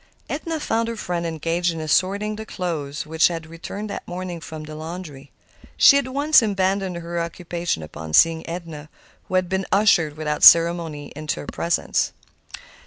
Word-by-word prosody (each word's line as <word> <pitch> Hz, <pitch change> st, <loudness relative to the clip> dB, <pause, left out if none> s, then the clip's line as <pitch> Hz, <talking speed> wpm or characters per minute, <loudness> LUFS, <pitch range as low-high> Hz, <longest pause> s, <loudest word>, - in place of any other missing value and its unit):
Edna 320 Hz, +2 st, -3 dB
found 230 Hz, -5 st, -1 dB
her 230 Hz, -, -3 dB
friend 175 Hz, -5 st, -3 dB
engaged 165 Hz, +2 st, -1 dB
in 165 Hz, -, -6 dB
assorting 195 Hz, +7 st, 0 dB
the 220 Hz, -, -6 dB
clothes 150 Hz, -6 st, -4 dB
which 160 Hz, +1 st, +3 dB
had 165 Hz, -2 st, -5 dB
returned 165 Hz, +6 st, -7 dB
that -, -, -7 dB
morning 175 Hz, -1 st, -5 dB
from 155 Hz, -1 st, -8 dB
the 155 Hz, 0 st, -9 dB
laundry. 155 Hz, -3 st, -8 dB, 0.5 s
She -, -, +8 dB
at 275 Hz, -, -4 dB
once 285 Hz, +3 st, +4 dB
abandoned 195 Hz, -3 st, 0 dB
her 170 Hz, 0 st, -4 dB
occupation 170 Hz, -, -3 dB
upon 80 Hz, 0 st, -8 dB
seeing 165 Hz, -, +5 dB
Edna, 165 Hz, -3 st, -7 dB, 0.4 s
who 185 Hz, -, -3 dB
had 185 Hz, -1 st, +2 dB
been 190 Hz, +1 st, -2 dB
ushered 180 Hz, -7 st, +3 dB
without 150 Hz, -1 st, -2 dB
ceremony 165 Hz, -3 st, +5 dB
into 150 Hz, -1 st, -3 dB
her -, -, -9 dB
presence. 170 Hz, +3 st, -1 dB
170 Hz, 165 wpm, -22 LUFS, 155-190 Hz, 0.5 s, She